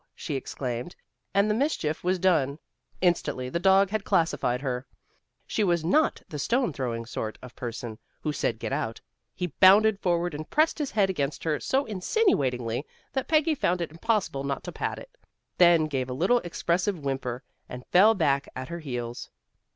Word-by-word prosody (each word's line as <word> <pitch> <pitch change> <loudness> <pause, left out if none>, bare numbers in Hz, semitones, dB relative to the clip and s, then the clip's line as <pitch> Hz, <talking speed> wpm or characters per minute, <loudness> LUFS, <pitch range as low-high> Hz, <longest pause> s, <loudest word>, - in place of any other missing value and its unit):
she 155 - -5
exclaimed, 130 +1 -4 0.4
and 200 +1 +3
the 210 - +2
mischief 215 - -1
was 185 +1 +1
done. 160 -7 +2 0.4
Instantly 145 -8 +1
the 170 - -1
dog 190 +1 +4
had 215 -2 -1
classified 160 -9 +1
her. 130 -2 -3 0.6
She 215 - 0
was 170 -4 +1
not 305 - +2
the 150 - -6
stone 240 - +1
throwing 120 -4 -3
sort 110 -1 -5
of 125 - -11
person, 120 -2 -6 0.2
who 150 - -2
said 120 -5 -1
"get 125 - -4
out." 125 -6 -2 0.4
He 180 -4 -4
bounded 200 +2 +7
forward 175 -3 0
and 150 +1 -6
pressed 310 +2 +2
his 290 -3 -1
head 200 -3 +2
against 140 -5 -3
her 155 -2 0
so 270 +2 0
insinuatingly 140 - 0 0.3
that 265 -2 -2
Peggy 315 0 +3
found 180 - 0
it 170 -3 -3
impossible 180 -5 -1
not 140 -1 -3
to - - -6
pat - - -3
it, - - -12 0.4
then 170 -3 +6
gave 135 -4 -2
a - - -3
little 185 - +3
expressive 175 +1 -1
whimper, 135 -3 -3 0.3
and 125 0 -8
fell 210 +5 +6
back 140 -6 +1
at 130 - -6
her 170 0 -5
heels. 120 -5 -5
165 Hz, 175 wpm, -27 LUFS, 130-195 Hz, 0.6 s, bounded